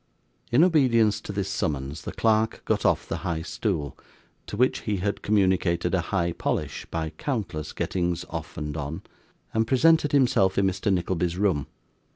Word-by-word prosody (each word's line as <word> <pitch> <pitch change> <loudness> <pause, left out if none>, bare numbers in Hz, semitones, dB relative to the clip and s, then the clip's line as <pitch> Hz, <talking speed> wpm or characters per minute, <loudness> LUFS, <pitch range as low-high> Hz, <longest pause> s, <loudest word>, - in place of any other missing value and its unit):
In 125 +7 +6
obedience 125 - +3
to - - -6
this 100 -1 -2
summons 75 -5 -2
the - - -4
clerk 110 0 +1
got - - +1
off - - +1
the - - -2
high 85 -3 -3
stool 85 - -2 0.5
(to 105 - -5
which 125 +3 +2
he 105 -2 -2
had 100 +2 -2
communicated 95 -4 +1
a 95 - +2
high 85 -1 -1
polish - - -3
by 80 -1 -3
countless 90 - -3
gettings 90 -1 -2
off 85 +2 -6
and 75 -2 -4
on), 75 +1 -5 0.5
and 110 0 +1
presented 155 +4 +4
himself 120 -9 +3
in 100 - +3
Mr. 95 +2 0
Nickleby's 90 -1 0
room. 95 -9 +1
95 Hz, 165 wpm, -26 LUFS, 85-110 Hz, 0.5 s, In